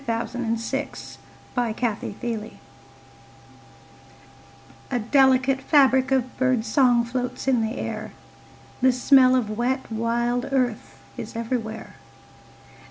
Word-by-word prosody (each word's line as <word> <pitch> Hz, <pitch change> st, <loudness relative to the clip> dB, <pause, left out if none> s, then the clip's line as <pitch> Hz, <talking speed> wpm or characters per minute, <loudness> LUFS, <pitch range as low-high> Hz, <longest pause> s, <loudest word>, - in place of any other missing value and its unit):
VI 230 Hz, 0 st, 0 dB
The 240 Hz, +3 st, -3 dB, 0.7 s
Dark 235 Hz, -3 st, -1 dB
Cup 230 Hz, -4 st, -1 dB
May -, -, -4 dB
Day 225 Hz, 0 st, -6 dB, 2.3 s
A 250 Hz, -, 0 dB
delicate 265 Hz, +2 st, +3 dB
fabric 265 Hz, -3 st, +4 dB
of 255 Hz, -1 st, 0 dB
bird 255 Hz, -3 st, +1 dB
song 240 Hz, 0 st, +3 dB
Floats 250 Hz, +2 st, -4 dB
in 255 Hz, -3 st, +3 dB
the 225 Hz, +3 st, -3 dB
air, -, -, -5 dB, 0.7 s
The 260 Hz, +1 st, +5 dB
smell 255 Hz, 0 st, +5 dB
of 215 Hz, -4 st, -1 dB
wet 260 Hz, +1 st, -1 dB
wild 235 Hz, +3 st, -1 dB
earth 250 Hz, -4 st, -1 dB, 0.2 s
Is -, -, -7 dB
everywhere. 225 Hz, -1 st, -4 dB
245 Hz, 110 wpm, -24 LUFS, 230-260 Hz, 2.3 s, The